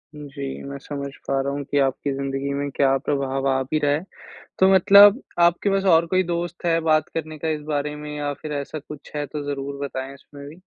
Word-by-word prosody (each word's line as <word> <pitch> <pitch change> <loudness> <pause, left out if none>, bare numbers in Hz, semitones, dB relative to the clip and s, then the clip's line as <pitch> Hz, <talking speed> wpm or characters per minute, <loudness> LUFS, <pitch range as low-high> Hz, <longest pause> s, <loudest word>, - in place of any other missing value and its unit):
जी, 140 -2 -7
मैं 140 - -6
समझ 140 0 -6 0.2
पा 135 - +1
रहा 140 +1 -2
हूँ 145 0 -3
कि 145 - -2
आपकी 135 +1 0
ज़िंदगी 135 0 -3
में 140 0 -2
क्या 135 -1 +3
प्रभाव 135 -1 -1
आ 135 0 +1
भी 155 +4 -1
रहा 145 -1 +1
है। 155 +5 -1 0.5
तो 190 - +5
मतलब 200 +5 +7 0.2
आपके 175 +4 +1
पास 195 0 +1
और 165 +1 +5
कोई 185 +2 +2
दोस्त 175 0 -4
है, 165 -1 +3
बात 155 -2 +2
करने 155 -1 -4
का 160 - -3
इस 155 -1 -1
बारे 150 0 -1
में? 150 0 -8
या 145 -1 -2
फिर 155 - -5
ऐसा 140 +2 -6
कुछ 150 0 -11
है, 145 0 -2
तो 145 +2 -5
ज़रूर 140 0 -4
बताएँ 135 0 -5
इसमें 140 +1 -13
भी। 160 +5 -14
145 Hz, 225 wpm, -23 LUFS, 140-160 Hz, 0.5 s, मतलब